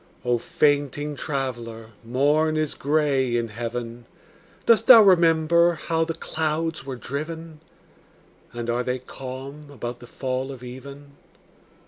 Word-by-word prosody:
O 120 Hz, -1 st, +2 dB
fainting 145 Hz, +2 st, 0 dB
traveller, 120 Hz, -6 st, -4 dB
morn 145 Hz, +6 st, +2 dB
is 155 Hz, -1 st, -1 dB
gray 140 Hz, -4 st, +1 dB
in 115 Hz, -1 st, -2 dB
heaven. 120 Hz, +1 st, -5 dB, 0.6 s
Dost 230 Hz, 0 st, +4 dB
thou 230 Hz, -4 st, +10 dB
remember 170 Hz, -2 st, +4 dB
how 165 Hz, +1 st, -1 dB
the 165 Hz, 0 st, -4 dB
clouds 160 Hz, -1 st, -2 dB
were 135 Hz, -1 st, -5 dB
driven? 155 Hz, +5 st, -6 dB, 0.9 s
And 120 Hz, -1 st, -5 dB
are 120 Hz, +1 st, 0 dB
they 125 Hz, +1 st, -1 dB
calm 135 Hz, +3 st, -9 dB
about 120 Hz, -3 st, -6 dB
the 120 Hz, -, -12 dB
fall 130 Hz, +1 st, -3 dB
of 130 Hz, -2 st, -10 dB
even? 140 Hz, +3 st, -10 dB
140 Hz, 125 wpm, -24 LUFS, 125-155 Hz, 0.9 s, thou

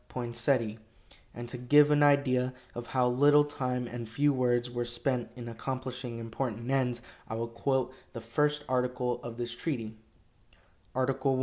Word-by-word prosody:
Poinsette, 120 Hz, -2 st, 0 dB, 0.5 s
and 120 Hz, 0 st, -7 dB
to 125 Hz, +1 st, -6 dB
give 145 Hz, +4 st, +6 dB
an 145 Hz, 0 st, +4 dB
idea 130 Hz, -3 st, +3 dB, 0.2 s
of 120 Hz, 0 st, -6 dB
how 125 Hz, -2 st, +2 dB
little 145 Hz, +4 st, +6 dB
time 125 Hz, -4 st, -2 dB
and 120 Hz, -2 st, -6 dB
few 145 Hz, +5 st, +2 dB
words 120 Hz, -1 st, +1 dB
were 120 Hz, 0 st, -1 dB
spent 120 Hz, +1 st, -1 dB
in 120 Hz, -1 st, -7 dB
accomplishing 125 Hz, 0 st, -4 dB
important 115 Hz, +1 st, -3 dB
ends, 125 Hz, -3 st, +1 dB, 0.2 s
I 110 Hz, -, -4 dB
will 115 Hz, +1 st, -2 dB
quote 130 Hz, +2 st, 0 dB, 0.2 s
the 115 Hz, -, -6 dB
first 150 Hz, +6 st, 0 dB
article 125 Hz, -1 st, 0 dB
of 120 Hz, -1 st, -7 dB
this 120 Hz, -1 st, -3 dB
treaty: 115 Hz, -5 st, -3 dB, 1.0 s
"Article 130 Hz, +1 st, +1 dB
I. -, -, 0 dB
125 Hz, 155 wpm, -30 LUFS, 120-135 Hz, 1.0 s, give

